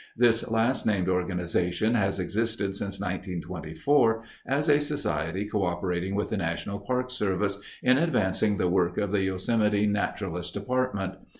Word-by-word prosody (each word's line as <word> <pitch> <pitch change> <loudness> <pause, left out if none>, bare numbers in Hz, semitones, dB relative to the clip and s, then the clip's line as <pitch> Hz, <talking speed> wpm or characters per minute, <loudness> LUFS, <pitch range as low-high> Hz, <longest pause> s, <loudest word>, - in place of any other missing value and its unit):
This 120 -1 +3
last 115 +3 +2
named 100 -4 +1
organization 90 +2 0
has 100 -4 +1
existed 105 0 -1
since 100 0 -3
1924 95 - 0 0.2
as 145 +3 +1
a 145 -1 +5
society 95 - -1
coöperating 90 -2 -1
with 105 - -1
the - - 0
National 95 +3 -3
Park 125 +5 -2
Service 100 -4 0 0.2
in 130 +2 +5
advancing 105 - +1
the 90 - +1
work 90 -1 +1
of 100 -2 0
the 100 -1 +2
Yosemite 105 +2 +1
Naturalist 100 -4 -2
Department. 100 -3 -1
100 Hz, 135 wpm, -27 LUFS, 90-115 Hz, 0.2 s, a